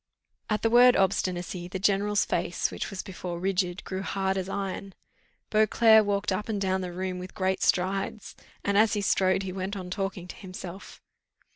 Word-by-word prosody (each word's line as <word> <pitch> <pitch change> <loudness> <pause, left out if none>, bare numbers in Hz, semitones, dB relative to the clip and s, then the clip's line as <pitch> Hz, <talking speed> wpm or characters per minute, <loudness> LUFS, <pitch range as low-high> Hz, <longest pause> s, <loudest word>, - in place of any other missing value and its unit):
At 210 -1 0
the 225 - +3
word 245 +1 +7
obstinacy, 180 -2 0
the 185 - -4
general's 205 +2 +2
face, - - -1
which - - -4
was 195 -3 -5
before 180 -2 -6
rigid, 185 -1 -1
grew 190 0 -4
hard 195 -1 -1
as 190 0 -3
iron. 195 -1 -4 0.6
Beauclerc 220 +1 +5
walked 200 0 0
up 210 +4 -2
and 210 -2 -1
down 190 -1 0
the 180 -1 -4
room 185 +1 -4
with 185 +1 -9
great 190 0 0
strides, 195 +3 0 0.3
and 200 0 +2
as 220 -1 +4
he 205 - 0
strode 190 -1 +2
he 185 -1 -5
went 190 +2 -4
on 180 -1 -7
talking 195 -2 -3
to - - -7
himself. 185 0 -9
190 Hz, 180 wpm, -27 LUFS, 185-200 Hz, 0.6 s, word